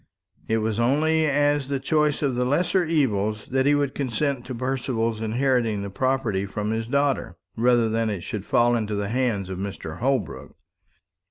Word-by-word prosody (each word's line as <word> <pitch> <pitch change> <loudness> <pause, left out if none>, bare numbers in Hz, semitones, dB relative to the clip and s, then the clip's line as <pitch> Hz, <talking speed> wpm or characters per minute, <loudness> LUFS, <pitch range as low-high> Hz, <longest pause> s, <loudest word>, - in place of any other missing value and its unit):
It 110 - +1
was 110 0 -1
only 155 +6 +2
as 145 -1 +2
the 140 -1 -1
choice 150 +1 +1
of 135 -2 +1
the 125 +1 0
lesser 175 +8 +2
evil 125 - +1 0.2
that 130 +1 +2
he 145 - +5
would 140 -2 0
consent 135 0 -2
to 130 - -5
Percival's 120 -3 -2
inheriting 115 -2 +1
the 100 - -6
property 120 -5 0
from 105 +2 -3
his 110 0 -2
daughter, 140 +1 0 0.2
rather 120 0 +3
than 110 0 0
it 100 -4 -3
should 105 -3 -5
fall 120 +3 +3
into 110 -2 -2
the 100 0 -2
hands 115 -5 0
of 95 -1 -5
Mr. 95 -5 -6
Holbrook. 135 +2 -2
125 Hz, 175 wpm, -24 LUFS, 110-140 Hz, 0.2 s, he